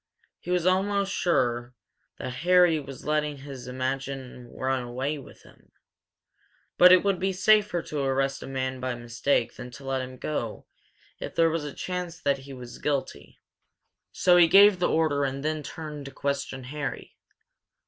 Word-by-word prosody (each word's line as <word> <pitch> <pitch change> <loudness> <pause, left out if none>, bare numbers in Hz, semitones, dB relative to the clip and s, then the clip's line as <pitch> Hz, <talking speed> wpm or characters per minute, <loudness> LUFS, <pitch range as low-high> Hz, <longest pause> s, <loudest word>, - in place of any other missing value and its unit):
He - - -10
was 180 -1 +1
almost 195 +2 +1
sure 120 -7 0 0.4
that 125 0 -5
Harry 175 -2 +5
was 135 -3 -10
letting 150 -1 0
his 135 -2 -9
imagination 130 -1 -4
run 130 0 -1
away 130 +5 -3
with 135 - -14
him, - - -21 1.0
but 180 0 +8
it 185 -1 +7
would 200 -2 +1
be 190 +1 0
safer 205 -2 +3
to 150 - -4
arrest 135 0 0
a - - -7
man 130 -1 -3
by 130 -1 -2
mistake 120 +1 0
than 125 - -8
to 135 +3 -12
let 135 -1 -1
him 130 0 -7
go 120 -6 -4 0.5
if - - -6
there 165 -1 +4
was 165 -1 -2
a 145 - -5
chance 180 -1 -5
that 140 -2 +1
he 135 +1 -11
was 125 -2 -9
guilty. 140 -2 -3 0.7
So 180 -1 +4
he 175 -1 +7
gave 200 +1 +7
the 175 - +2
order 155 -3 +2
and 135 +1 -3
then 155 0 -1
turned 150 -2 -7
to 135 - -8
question 140 -2 -3
Harry. 140 +2 -6
140 Hz, 170 wpm, -27 LUFS, 130-170 Hz, 1.0 s, but